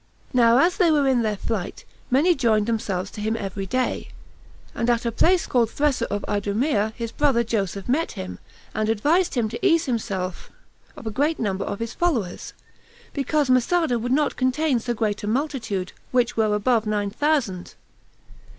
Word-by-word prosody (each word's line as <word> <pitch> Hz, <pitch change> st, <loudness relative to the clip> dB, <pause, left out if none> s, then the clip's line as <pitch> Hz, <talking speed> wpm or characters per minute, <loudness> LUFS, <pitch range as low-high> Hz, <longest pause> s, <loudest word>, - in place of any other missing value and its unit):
Now 235 Hz, -1 st, +5 dB
as 340 Hz, +6 st, +3 dB
they 360 Hz, -5 st, +4 dB
were 295 Hz, -3 st, +3 dB
in 255 Hz, -3 st, +3 dB
their 215 Hz, -2 st, -1 dB
flight, 200 Hz, -3 st, -4 dB, 0.2 s
many 295 Hz, +8 st, +4 dB
joined 225 Hz, -8 st, +2 dB
themselves 200 Hz, -4 st, -2 dB
to 210 Hz, -, -7 dB
him 220 Hz, +2 st, -1 dB
every 195 Hz, -1 st, -4 dB
day; 255 Hz, +5 st, -1 dB, 0.7 s
and 235 Hz, -, -1 dB
at 235 Hz, 0 st, +1 dB
a 235 Hz, -, +1 dB
place 345 Hz, +9 st, +3 dB
called 235 Hz, -3 st, +2 dB
Thressa 290 Hz, 0 st, 0 dB
of 205 Hz, 0 st, -3 dB
Idumea 210 Hz, +2 st, 0 dB
his 230 Hz, -1 st, -4 dB
brother 270 Hz, -5 st, +2 dB
Joseph 200 Hz, -4 st, -2 dB
met 295 Hz, +7 st, 0 dB
him, 90 Hz, -1 st, -7 dB, 0.3 s
and 215 Hz, 0 st, -1 dB
advised 300 Hz, -, +2 dB
him 235 Hz, -3 st, +1 dB
to 235 Hz, -, -7 dB
ease 335 Hz, -3 st, +4 dB
himself 195 Hz, -, -3 dB, 0.5 s
of -, -, -10 dB
a 220 Hz, -, -2 dB
great 295 Hz, +8 st, +1 dB
number 195 Hz, -3 st, -2 dB
of 200 Hz, -, -3 dB
his 230 Hz, +1 st, -4 dB
followers, 250 Hz, -, -1 dB, 0.6 s
because 290 Hz, +1 st, 0 dB
Masada 255 Hz, +1 st, +2 dB
would 245 Hz, +2 st, -3 dB
not 295 Hz, +2 st, +1 dB
contain 260 Hz, +1 st, +1 dB
so 240 Hz, +1 st, -3 dB
great 210 Hz, -2 st, -1 dB
a -, -, -3 dB
multitude, 230 Hz, -7 st, -2 dB, 0.2 s
which 245 Hz, -1 st, +1 dB
were 215 Hz, -2 st, +2 dB
above 220 Hz, +1 st, +1 dB
nine 205 Hz, -1 st, -1 dB
thousand. 270 Hz, -, -1 dB
235 Hz, 175 wpm, -23 LUFS, 210-280 Hz, 0.7 s, Now